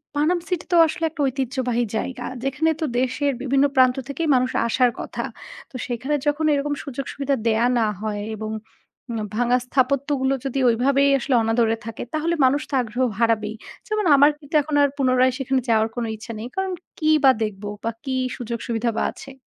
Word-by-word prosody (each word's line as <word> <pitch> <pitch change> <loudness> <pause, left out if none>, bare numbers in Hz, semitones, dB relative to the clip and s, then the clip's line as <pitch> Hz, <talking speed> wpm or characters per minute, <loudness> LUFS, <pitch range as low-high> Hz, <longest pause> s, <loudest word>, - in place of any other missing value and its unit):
Panam 325 +5 +2
city 360 -3 -2
তো - - +6
আসলে 325 +1 -2
একটা 310 -1 -6
ঐতিহ্যবাহী 255 -2 -1
জায়গা, 260 +3 -4 0.2
যেখানে 275 +4 +1
তো - - +1
দেশের 260 +3 0
বিভিন্ন 275 +1 +2
প্রান্ত 255 -1 +5
থেকে 280 - -4
মানুষ 255 0 +1 0.2
আসার 250 +1 +3
কথা। - - -4 0.5
তো - - -15
সেখানে 255 +5 -2
যখন 295 +2 +1
এরকম 290 +1 0
সুযোগ 275 0 -5
সুবিধা 275 0 0
দেয়া 230 +2 +3
না 220 - +2
হয় 205 -1 -3
এবং 215 0 -5 0.6
উম 230 - -2 0.2
ভাঙ্গা 245 +2 +3
স্থাপত্যগুলো 270 +1 +1
যদি 270 0 -1
ওইভাবেই 275 +4 +3
আসলে 260 +1 0
অনাদরে 225 0 +2
থাকে 225 -1 -6
তাহলে 325 +2 0
মানুষ 280 +3 +3
তো - - -11
আগ্রহ 240 +2 -2 0.2
হারাবেই। 220 -2 +1 0.3
যেমন 430 -1 -1
আমার 285 +2 +6
কিন্তু 295 +1 -8
এখন 295 +1 -3
আর 285 - +3
পুনরায় 255 -1 +3
সেখানে 265 0 0
যাওয়ার 220 -1 +3
কোন 240 - -2
ইচ্ছা 220 +2 -8
নেই। 225 - -5
কারণ 380 -1 -1 0.3
কি 310 -2 +1
বা 265 - +8
দেখবো 205 -1 -4
বা 230 - 0
কি 265 -2 -2 0.2
সুযোগ 235 -1 -4
সুবিধা 235 0 0
বা - - +1
আছে? 270 - -11
260 Hz, 185 wpm, -23 LUFS, 235-285 Hz, 0.6 s, বা